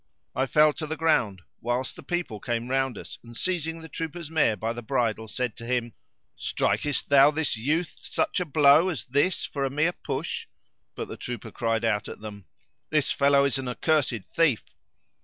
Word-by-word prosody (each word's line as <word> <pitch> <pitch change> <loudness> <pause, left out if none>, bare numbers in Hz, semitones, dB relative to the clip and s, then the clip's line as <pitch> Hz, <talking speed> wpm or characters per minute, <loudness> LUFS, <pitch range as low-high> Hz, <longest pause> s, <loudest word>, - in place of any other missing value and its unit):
I 130 +1 +1
fell 150 +2 +5
to 155 - -5
the 160 +1 -3
ground, 115 - +1 0.2
whilst 120 +2 -2
the - - -10
people 175 - -3
came 120 +2 -2
round 135 -4 +1
us - - -9
and 120 0 -11
seizing 165 -3 -1
the - - -8
trooper's 160 0 -5
mare 150 -9 +3
by 115 +4 -2
the 120 - -6
bridle 115 -3 0
said 125 0 -2
to - - -8
him, 120 -2 -1 0.4
"Strikest 120 +7 0
thou 140 0 +8
this 150 -3 0
youth 150 +10 -1
such - - -1
a 180 - -1
blow 150 +3 +5
as 175 - -3
this 145 +6 +1
for 140 -1 -3
a 135 - +1
mere 150 +6 +1
push!" - - -4 0.5
But - - -4
the - - -7
trooper 120 -3 -6
cried 115 -1 0
out 105 -2 +1
at - - -8
them, 105 -3 -9 0.4
"This 155 -3 +2
fellow 140 0 +4
is 135 -1 +1
an 130 - -4
accursed 125 - +1
thief!" 155 -9 +3
135 Hz, 190 wpm, -26 LUFS, 115-155 Hz, 0.5 s, thou